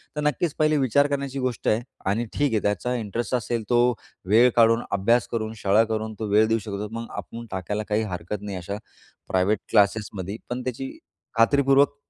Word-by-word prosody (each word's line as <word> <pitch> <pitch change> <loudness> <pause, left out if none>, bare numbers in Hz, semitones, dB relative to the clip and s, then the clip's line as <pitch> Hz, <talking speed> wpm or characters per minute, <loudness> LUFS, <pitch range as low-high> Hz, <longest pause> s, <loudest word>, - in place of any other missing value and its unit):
तर 150 - -2
नक्कीच 150 +2 0
पहिले 155 0 +3
विचार 140 +1 +3
करण्याची 140 -1 -3
गोष्ट 125 -2 -2
आहे 110 +2 +3 0.3
आणि 115 +4 0
ठीक 145 -1 +1
आहे 110 - +3
त्याचा 105 +5 0
इंटरेस्ट 115 +1 -2
असेल 120 -1 -2
तो 120 - +3 0.5
वेळ 115 +4 +6
काढून, 115 0 +5
अभ्यास 110 +4 +2
करून, 110 -1 -2
शाळा 105 +1 +4
करून, 110 0 -2
तो 110 - -2
वेळ 110 +1 +5
देऊ 115 0 +2
शकतो 105 0 -5
मग 115 - -6
आपण 115 0 -7
टाकायला 100 +3 -3
काही 105 +1 +1
हरकत 90 +4 -5
नाही, 100 -2 -5
अशा 90 +3 -5 0.5
प्रायव्हेट 95 +3 +2
क्लासेसमध्ये. 100 -1 +1
पण 125 +1 -3
त्याची 130 +1 -4 0.5
खात्रीपूर्वक 140 +3 +4
115 Hz, 180 wpm, -25 LUFS, 105-125 Hz, 0.5 s, वेळ